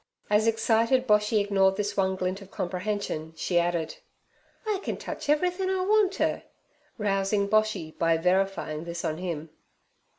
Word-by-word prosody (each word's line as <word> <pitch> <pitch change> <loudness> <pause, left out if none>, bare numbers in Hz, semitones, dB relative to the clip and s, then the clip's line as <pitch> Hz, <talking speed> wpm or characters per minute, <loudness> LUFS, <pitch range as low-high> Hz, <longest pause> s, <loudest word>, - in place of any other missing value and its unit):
As 210 +2 +4
excited 225 +3 +2
Boshy 210 -1 +3
ignored 195 -1 +3
this 205 -1 -2
one 190 -1 +1
glint 185 +1 -2
of 195 - -12
comprehension, 180 -4 -3
she 175 +2 +1
added: 170 -2 -1 0.7
'I 425 -3 0
can - - -3
touch - - -6
everythin' 360 +5 +1
I 380 -1 0
want 415 -1 +3
t" - - 0 0.6
rousing 200 -1 +1
Boshy 215 -7 +1
by 165 0 +3
verifying 180 -3 0
this 170 0 -5
on 155 +1 -2
him. 165 -4 -4
195 Hz, 145 wpm, -27 LUFS, 175-220 Hz, 0.7 s, As